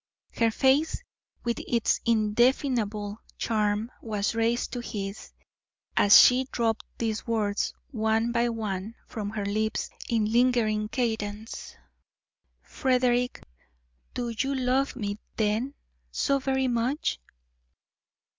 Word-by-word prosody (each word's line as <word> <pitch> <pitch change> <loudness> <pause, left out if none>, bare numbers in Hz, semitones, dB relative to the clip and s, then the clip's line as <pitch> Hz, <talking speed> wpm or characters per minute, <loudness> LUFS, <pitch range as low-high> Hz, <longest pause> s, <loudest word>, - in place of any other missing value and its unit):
Her 230 -1 +2
face, 270 - +2 0.4
with 235 -1 -1
its 235 -2 +2
indefinable 220 -1 +1 0.2
charm, 215 +1 0
was 210 -2 -1
raised 230 +1 0
to 245 - -2
his, 200 -3 -6 0.6
as 205 - +8
she 255 +1 +6
dropped 225 -2 0
these 225 -1 -2
words 210 -3 0 0.2
one 220 -1 +1
by 235 0 +2
one 215 -2 -4
from 210 -2 -5
her 210 -1 -3
lips 215 +2 -1 0.2
in 225 -3 +2
lingering 230 -3 +2
cadence: 220 -3 -3 0.9
"Frederick 250 -1 +1 0.7
do 240 -1 -2
you 270 +5 -1
love 260 +2 +1
me, 205 -3 -3 0.2
then, 225 +6 0 0.3
so 275 0 +1
very 265 0 0
much?" 245 - 0
230 Hz, 110 wpm, -27 LUFS, 215-250 Hz, 0.9 s, as